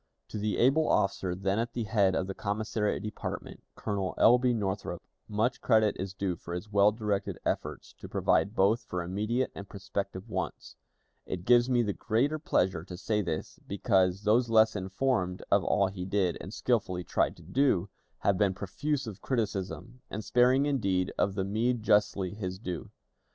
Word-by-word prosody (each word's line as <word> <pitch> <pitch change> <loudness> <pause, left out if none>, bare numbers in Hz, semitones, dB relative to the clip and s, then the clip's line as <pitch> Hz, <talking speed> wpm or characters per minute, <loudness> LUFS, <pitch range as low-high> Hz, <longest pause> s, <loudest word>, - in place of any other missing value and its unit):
To 105 - -5
the 105 0 -1
able 140 +6 +3
officer 95 -2 +1
then 95 +2 0
at 115 +1 -2
the 120 - -2
head 100 -4 +2
of 95 - 0
the 95 - -4
commissariat 105 0 -2
department, 105 - -6
Colonel 100 -3 -2
L. 125 +2 +6
B. 125 0 +2
Northrop, 100 -5 -2 0.3
much 115 +4 0
credit 110 -3 +3
is 95 0 -4
due 95 -2 -1
for 85 +1 -7
his 105 +4 -7
well 100 0 +5
directed 105 -2 -2
efforts - - -3
to - - -9
provide 100 +3 +1
both 105 +5 +3
for 90 -1 -4
immediate 105 +8 -1
and 100 - -9
prospective 100 0 -5
wants. 110 - -4 0.5
It 90 -1 -5
gives 120 +1 +5
me 120 -2 +3
the 105 -2 -1
greater 130 +10 0
pleasure 95 - +1
to 90 -1 -8
say 105 +2 0
this, 85 -5 -4
because 95 -1 +1
those 115 +3 +3
less 110 -1 +5
informed 95 -1 -1
of - - +4
all 100 - +2
he 95 -1 -4
did, 95 -2 +1
and 95 - -8
skillfully 100 -7 0
tried - - 0
to - - -14
do, 95 - +2 0.3
have 100 -2 +2
been 100 -3 +2
profuse 140 +9 -2
of 105 -5 -8
criticism, 110 0 -3
and 110 +1 -5
sparing 125 +3 +4
indeed 100 -10 0
of 100 - +1
the 95 - 0
meed 110 +4 0
justly 100 -3 +2
his 95 -3 -4
due. 90 -5 -5
105 Hz, 175 wpm, -29 LUFS, 95-115 Hz, 0.5 s, L